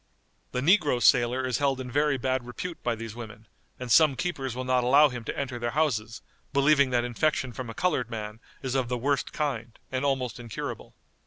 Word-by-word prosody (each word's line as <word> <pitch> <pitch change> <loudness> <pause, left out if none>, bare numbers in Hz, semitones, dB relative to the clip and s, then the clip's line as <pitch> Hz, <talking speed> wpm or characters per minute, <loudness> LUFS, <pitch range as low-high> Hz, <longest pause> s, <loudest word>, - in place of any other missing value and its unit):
The 125 - -2
negro 150 -5 +4
sailor 125 +2 +4
is 125 -2 -1
held 135 -2 +1
in 125 -1 -6
very 145 +1 +2
bad 130 0 -1
repute 170 +8 -6
by 120 -1 -1
these 115 -1 -7
women, 110 -2 -9 0.3
and 125 -2 -5
some 155 -1 +6
keepers 135 -7 -3
will 130 - -3
not 130 -1 +2
allow 140 +4 +6
him 125 -2 -6
to - - -4
enter 130 -3 -3
their 120 +4 -3
houses, 115 -8 0 0.3
believing 140 0 +4
that 120 -1 +1
infection 130 +1 0
from 125 -1 -6
a 115 - -7
colored 150 -10 0
man 105 -1 -6 0.2
is 130 -2 -2
of 130 -3 0
the 125 - -1
worst 140 +3 0
kind, 120 -7 -3
and 130 +1 -1
almost 130 -4 -1
incurable. 115 -3 -6
130 Hz, 200 wpm, -27 LUFS, 120-140 Hz, 0.3 s, some